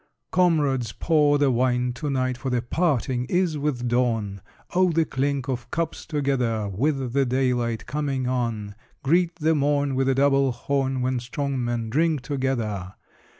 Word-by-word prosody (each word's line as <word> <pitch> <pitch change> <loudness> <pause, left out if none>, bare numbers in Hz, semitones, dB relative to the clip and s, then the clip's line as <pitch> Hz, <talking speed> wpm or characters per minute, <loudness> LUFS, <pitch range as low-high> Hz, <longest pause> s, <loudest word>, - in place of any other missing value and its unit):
Comrades, 150 -9 +2
pour 150 -3 +3
the 145 -2 +3
wine 125 0 +1
to 145 +4 -4
night 130 -2 0
For 130 +2 -4
the 125 -2 0
parting 130 -5 0
is 175 +2 +1
with 140 -4 -1
dawn! 115 -5 0 0.3
Oh, 185 0 +3
the 165 0 +2
clink 140 -1 -1
of 125 -3 -3
cups 165 0 -3
together, 125 -8 0
With 130 +5 -1
the 140 0 +3
daylight 125 -3 0
coming 140 -3 -2
on! 115 -5 -2 0.3
Greet 170 +4 +2
the 160 -1 +2
morn 145 -1 +1
With 135 0 +1
a 135 - +2
double 135 -1 +3
horn, 135 0 -1
When 130 0 0
strong 135 +2 -3
men 120 -2 -2
drink 155 +1 +2
together! 120 -8 -2
130 Hz, 155 wpm, -24 LUFS, 120-145 Hz, 0.3 s, pour